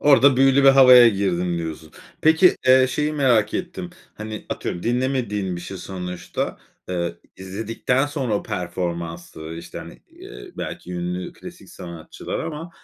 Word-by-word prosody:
Orada 140 -2 +6
büyülü 135 +1 +4
bir - - +9
havaya 130 -3 +9
girdim, 90 -4 -1
diyorsun. 80 -1 -6 0.3
Peki, 160 +4 +5
eee, 130 0 +6
şeyi 150 +3 -1
merak 125 -8 +2
ettim. 180 0 -4 0.2
Hani, 110 0 -7
atıyorum, 85 - -4
dinlemediğin 120 -7 -1
bir - - -6
şey 95 +2 -7
sonuçta. 90 -1 -5 0.3
Eee, 85 -2 -2 0.2
izledikten 110 +7 -1
sonra 135 -6 -2
o 100 - -1
performansı, 85 -2 -5
işte, 85 - -8
hani, - - -11
iii, - - -12
belki 90 - -6
ünlü 90 +1 -4
klasik - - -12
sanatçılar 85 -2 -7
ama 165 +2 -5
105 Hz, 140 wpm, -22 LUFS, 90-135 Hz, 0.3 s, bir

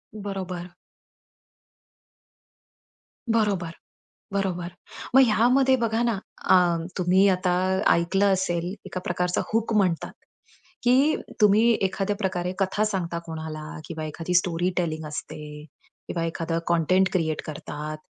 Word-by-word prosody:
बरोबर. 185 -3 -5 2.6
बरोबर. 200 -7 +1 0.6
बरोबर. 180 -3 -1 0.5
मग 270 - +9
ह्यामध्ये 255 +4 +4
बघा 230 -1 0
ना, 235 -1 +2 0.4
अ, - - +8 0.4
तुम्ही 185 +2 +4
आता 180 -1 +1 0.4
ऐकलं 195 +4 +2
असेल, 175 -1 -1
एका 185 - -5
प्रकारचा 180 0 0
हूक 225 0 +1
म्हणतात, 185 -6 +1 0.7
की 265 +5 +4 0.3
तुम्ही 215 +3 +5
एखाद्या 195 +1 0
प्रकारे 185 -3 -2
कथा 195 +2 +1
सांगता 175 -5 -2
कोणाला 160 -1 -6 0.2
किंवा 160 -2 -5
एखादी 165 +3 -4
स्टोरी 175 0 +2
टेलिंग 160 -3 -1
असते, 150 0 -7 0.4
किंवा 165 -1 -2
एखादा 165 0 -2
कंटेंट 180 +3 +3
क्रिएट 160 -4 0
करतात 150 0 -6
180 Hz, 110 wpm, -25 LUFS, 165-200 Hz, 2.6 s, मग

